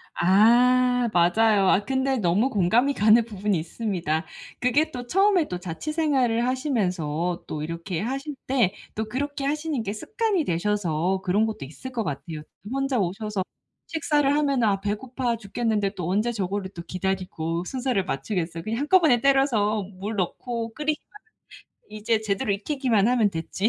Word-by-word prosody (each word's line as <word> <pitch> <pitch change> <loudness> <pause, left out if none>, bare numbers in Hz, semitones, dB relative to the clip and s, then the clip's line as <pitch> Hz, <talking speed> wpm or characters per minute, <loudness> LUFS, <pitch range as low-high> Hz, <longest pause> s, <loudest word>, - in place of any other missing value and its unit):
아 245 +6 +4
맞아요. 195 +3 +4
아 200 - +3
근데 265 0 0
너무 210 +5 +2
공감이 230 +7 +2
가는 220 0 +5
부분이 205 -3 -1
있습니다. 170 -2 -2 0.3
그게 290 +6 +2
또 245 -3 -7
처음에 385 0 +3
또 180 - -4
자취 175 - -5
생활을 260 -7 +2
하시면서 180 - -1
또 150 -1 -4
이렇게 165 +2 -4
하실 275 +6 -3
때 245 -8 +2 0.2
또 220 +1 -2
그렇게 280 +4 -3
하시는 300 -2 -1
게 200 - -3
습관이 430 - -1
되셔서 180 0 0
그런 205 +3 +2
것도 215 -11 -4
있을 210 - -9
것 235 -3 -2
같아요. 150 +1 -5 0.3
혼자 270 -2 0
오셔서 195 +1 -2 0.4
식사를 295 -3 +1
하면 280 -4 +1
아 200 -3 +2
배고파 235 +3 -2
죽겠는데 210 -1 -1
또 180 -3 -3
언제 215 +6 +1
저거를 195 -2 -3
또 170 - -7
기다리고 180 -2 -3
순서를 250 -5 -1
맞추겠어요. 165 +2 -3
그냥 225 +5 -2
한꺼번에 300 -6 +4
때려서 235 -7 +2
물 200 +4 -5
넣고 230 +4 -3
끓이고 300 0 -1 0.9
이제 215 +1 -1
제대로 210 +1 -1
익히기만 230 0 +1
하면 235 -5 +3
됐지. 185 +5 -1
220 Hz, 335 characters per minute, -25 LUFS, 185-260 Hz, 0.9 s, 가는